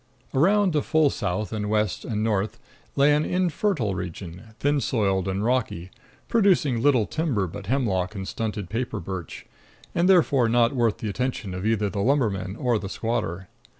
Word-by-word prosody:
Around 190 +6 +3
to 150 - +2
full 155 -2 +2
south 105 +5 -3
and 105 -1 -2
west 105 -2 0
and 105 -2 -2
north 105 -2 -1 0.4
lay 140 +2 +5
an 150 +1 +2
infertile 180 - 0
region, 90 -1 -6 0.2
thin 145 0 +1
soiled 95 -7 0
and 95 +2 -1
rocky, 110 -8 -1 0.4
producing 180 - +3
little 125 -5 +4
timber 140 - -1
but 95 +2 -8
hemlock 105 -6 0
and 95 -1 -5
stunted 105 -4 -3
paper 120 +6 -3
birch, 90 -2 -7 0.5
and 175 +2 +2
therefore 145 -10 +4
not 120 +1 +3
worth 120 -5 +1
the 110 - -5
attention 125 -2 -3
of 90 +3 -3
either 110 -2 +1
the 100 0 -3
lumberman 100 -7 0
or 120 -2 0
the 95 - -6
squatter. 105 -6 -3
110 Hz, 165 wpm, -25 LUFS, 95-140 Hz, 0.5 s, lay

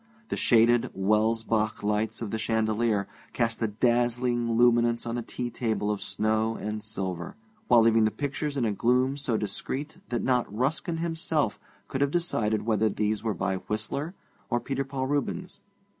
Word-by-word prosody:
The - - -1
shaded 120 0 +4
Welsbach 110 +2 +1
lights 105 +2 0
of 105 - -4
the 110 - -2
chandelier 110 -2 +1 0.3
cast 115 -1 0
a 115 - +2
dazzling 120 +1 +1
luminance 120 -1 +4
on 115 - -3
the 120 - -2
tea 120 +1 -5
table 110 -3 -1
of 105 - -3
snow 110 +2 0
and 105 0 -4
silver, 95 -5 -4 0.3
while 120 - +6
leaving 115 -1 +5
the - - +3
pictures 145 +3 -3
in 125 - +1
a 110 - +1
gloom 125 +5 +2
so 130 -6 0
discreet 135 - -4
that 120 - -1
not 125 -4 +1
Ruskin 145 +9 -1
himself 160 -6 -1 0.3
could 135 +6 -3
have 140 - +3
decided 115 -10 0
whether 110 -1 +2
these 105 0 -1
were 110 -3 -1
by 95 +3 -1
Whistler 110 - -3 0.3
or 120 - +1
Peter 135 +2 -2
Paul 135 -1 -3
Rubens. 145 +6 -2
115 Hz, 165 wpm, -27 LUFS, 110-130 Hz, 0.3 s, while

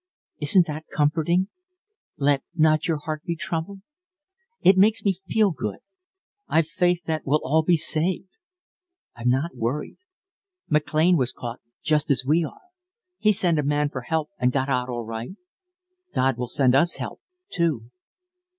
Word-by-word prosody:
Isn't 165 +4 +4
that 155 0 -6
comforting? 165 +5 +1 0.7
'Let 140 -1 +2
not 155 -1 +3
your 165 -2 +1
heart 155 0 -5
be 170 - -2
troubled.' 175 +3 -4 0.8
It 190 - +6
makes 210 +3 +4
me 190 -2 +1
feel 215 -2 +3
good. 105 - -4 0.7
I've 160 -1 +2
faith 175 +1 +1
that 160 -1 -1
we'll 150 +3 +2
all 155 +4 +3
be 170 +1 +3
saved. 175 +5 0 0.9
I'm 120 +1 -1
not 135 +6 0
worried. 125 +5 -3 0.7
McLean 155 +3 +3
was 130 -3 0
caught 120 0 -7 0.2
just 155 -1 +1
as 135 -2 +2
we 160 +5 +3
are. 155 - -8 0.6
He 215 - +4
sent 175 -5 +1
a - - +1
man 145 +1 +1
for 130 -3 -5
help 160 +6 -2
and 125 - +2
got 135 +1 -1
out 125 -1 0
all 120 -2 -4
right. 115 - -6 0.8
God 130 0 +2
will 125 0 -4
send 125 0 +2
us 170 +6 +4
help, - - -6 0.3
too." 145 -9 -1
155 Hz, 155 wpm, -24 LUFS, 135-170 Hz, 0.9 s, It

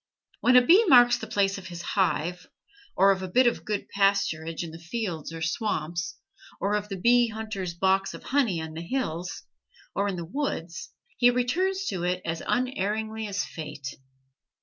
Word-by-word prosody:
When 250 - +4
a 250 0 +7
bee 370 - +7
marks 245 - +6
the - - -6
place 195 -1 +1
of 185 - -10
his 175 -1 -7
hive, 180 -2 -1 0.5
or 195 +2 +6
of 190 -1 -1
a 185 - -4
bit 250 +8 +4
of 240 - +1
good 210 -2 -3
pasturage 195 -5 +1
in 165 - -7
the 165 - -10
fields 175 -3 -4
or 165 -1 -5
swamps, 170 -2 -2 0.4
or 200 +1 0
of 210 0 -1
the 195 - -4
bee 240 +5 +4
hunter's 215 -5 -5
box 190 +2 +1
of - - -11
honey 250 -11 +1
on 160 0 -6
the 160 - -6
hills 175 -4 -3 0.5
or 200 +1 0
in 195 - -2
the 170 -1 -5
woods, 175 - -4 0.3
he 245 - +6
returns 365 +11 0
to 185 - -3
it 180 +1 -1
as 165 0 -3
unerringly 220 -3 -1
as 200 0 -2
fate. 145 -3 -7
195 Hz, 180 wpm, -27 LUFS, 170-240 Hz, 0.5 s, a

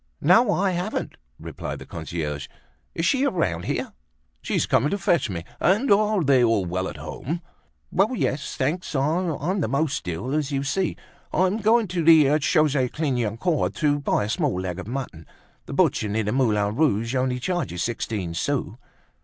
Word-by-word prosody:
"No, 205 - +5
I 195 -1 +1
haven't," 180 0 -3 0.2
replied - - -6
the - - -10
concierge. 75 -4 -5 0.5
"Is 165 - -1
she 265 +8 +2
around 105 - 0
here?" - - -3 0.5
"She's - - 0
coming 140 +6 +2
to 200 - -1
fetch 170 - +1
me. 85 -3 -4 0.2
And 210 +9 +2
are 210 -2 +3
they 135 -3 +4
all 115 -5 +2
well 95 +2 -2
at 75 - -7
home?" 100 - -5 0.5
"Why, 195 +3 +3
yes, 140 - -2
thanks; 150 +5 -2
I'm 165 +5 0
the - - 0
most 140 - -1
ill, 90 +10 -3
as 150 -2 -1
you 140 -1 -1
see. 180 +7 -1 0.3
I'm 185 +3 +2
going 225 +1 +3
to 175 -2 -1
the 155 -2 +6
Chaussee 150 -4 +2
Clignancourt 135 - -1
to 145 -2 +1
buy 140 - 0
a 105 - -3
small 145 - 0
leg 95 -1 -4
of 95 - -7
mutton. 120 - -6 0.4
The - - -6
butcher 105 - +2
near 110 +2 0
the 105 - -1
Moulin 105 -5 +1
Rouge 115 -6 +1
only 130 -1 0
charges 130 - -2
sixteen 110 -6 -3
sous." 120 +2 -2
140 Hz, 170 wpm, -24 LUFS, 105-175 Hz, 0.5 s, the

